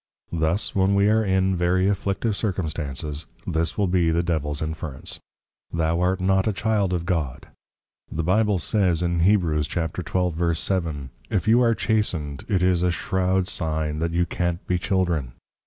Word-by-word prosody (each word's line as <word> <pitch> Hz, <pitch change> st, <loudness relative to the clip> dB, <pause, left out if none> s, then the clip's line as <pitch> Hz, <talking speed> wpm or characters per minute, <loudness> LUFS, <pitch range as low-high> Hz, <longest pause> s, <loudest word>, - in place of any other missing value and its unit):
_ 85 Hz, -, -1 dB
Thus, 80 Hz, +6 st, +1 dB
when 95 Hz, +1 st, +2 dB
we 100 Hz, +1 st, +4 dB
are 110 Hz, +1 st, +3 dB
in 95 Hz, -1 st, +2 dB
very 90 Hz, +2 st, +2 dB
Afflictive 100 Hz, +2 st, 0 dB
Circumstances, 80 Hz, -, -3 dB, 0.2 s
this 80 Hz, +1 st, -1 dB
will 105 Hz, -, +2 dB
be 90 Hz, -2 st, +2 dB
the 85 Hz, +1 st, +1 dB
Devils 75 Hz, -4 st, -1 dB
Inference, 80 Hz, -3 st, -4 dB, 0.5 s
Thou 85 Hz, 0 st, 0 dB
art 90 Hz, +1 st, +1 dB
not 95 Hz, +1 st, +2 dB
a 110 Hz, -, +1 dB
Child 105 Hz, -2 st, 0 dB
of 85 Hz, -2 st, -1 dB
God. 80 Hz, -8 st, -2 dB, 0.6 s
The 80 Hz, -, -2 dB
Bible 105 Hz, +3 st, +2 dB
says 90 Hz, -3 st, +1 dB
in 85 Hz, -1 st, 0 dB
Heb. 100 Hz, +4 st, +4 dB
12.7. 85 Hz, -1 st, -1 dB, 0.2 s
_If 100 Hz, -7 st, 0 dB
you 115 Hz, +3 st, +5 dB
are 115 Hz, -2 st, +3 dB
Chastened, 95 Hz, -, -1 dB
it 95 Hz, -4 st, +2 dB
is 90 Hz, -2 st, +3 dB
a 90 Hz, -, +2 dB
shrow'd 95 Hz, +1 st, 0 dB
sign 80 Hz, -4 st, -1 dB
that 85 Hz, +1 st, 0 dB
you 85 Hz, +1 st, +1 dB
can't 85 Hz, 0 st, -2 dB
be 90 Hz, -1 st, 0 dB
Children. 85 Hz, -10 st, 0 dB
90 Hz, 160 wpm, -24 LUFS, 80-95 Hz, 0.6 s, you